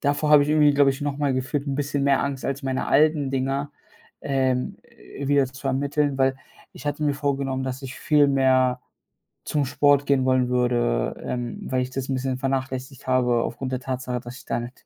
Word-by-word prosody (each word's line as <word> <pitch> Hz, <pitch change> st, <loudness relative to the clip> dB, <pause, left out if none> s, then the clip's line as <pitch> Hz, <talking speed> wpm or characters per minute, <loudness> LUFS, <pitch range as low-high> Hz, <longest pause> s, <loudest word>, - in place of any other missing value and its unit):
davor 150 Hz, +1 st, 0 dB
habe 150 Hz, -1 st, +8 dB
ich 145 Hz, -, -5 dB
irgendwie, 150 Hz, -1 st, +4 dB
glaube 140 Hz, -1 st, +5 dB
ich, 135 Hz, +2 st, -5 dB
noch 145 Hz, -1 st, -2 dB
mal 145 Hz, -2 st, +1 dB
gefühlt 135 Hz, +3 st, -2 dB
'n 135 Hz, -, -1 dB
bisschen 145 Hz, 0 st, -1 dB
mehr 140 Hz, -1 st, +3 dB
Angst 140 Hz, -2 st, -3 dB
als 140 Hz, +1 st, -3 dB
meine 130 Hz, -1 st, -2 dB
alten 150 Hz, -1 st, +3 dB
Dinger, 135 Hz, +2 st, -1 dB, 0.5 s
ähm, 130 Hz, -2 st, 0 dB
äh, 140 Hz, -, -10 dB
wieder 140 Hz, -2 st, +3 dB
zu 135 Hz, +1 st, -9 dB
ermitteln, 140 Hz, +1 st, 0 dB
weil 135 Hz, 0 st, +2 dB, 0.4 s
ich 145 Hz, -, -11 dB
hatte 145 Hz, +1 st, -2 dB
mir 145 Hz, -1 st, +1 dB
vorgenommen, 140 Hz, -2 st, -2 dB
dass 130 Hz, +1 st, -5 dB
ich 130 Hz, -1 st, -7 dB
viel 145 Hz, -2 st, +3 dB
mehr 130 Hz, -2 st, +3 dB, 0.6 s
zum 145 Hz, -2 st, 0 dB
Sport 145 Hz, +2 st, +3 dB
gehen 135 Hz, -2 st, +2 dB
wollen 130 Hz, -1 st, +2 dB
würde, 120 Hz, -, 0 dB
ähm, 120 Hz, -1 st, -4 dB
weil 130 Hz, -1 st, +1 dB
ich 125 Hz, -, -3 dB
das 135 Hz, 0 st, -4 dB
'n -, -, 0 dB
bisschen 130 Hz, 0 st, -2 dB
vernachlässigt 130 Hz, 0 st, -3 dB
habe 125 Hz, -2 st, +2 dB
aufgrund 130 Hz, +3 st, -4 dB
der 130 Hz, -, -1 dB
Tatsache, 130 Hz, -1 st, -3 dB
dass 120 Hz, +2 st, -10 dB
ich -, -, -14 dB
da -, -, -1 dB
mit 120 Hz, +2 st, -9 dB
135 Hz, 205 wpm, -24 LUFS, 130-145 Hz, 0.6 s, habe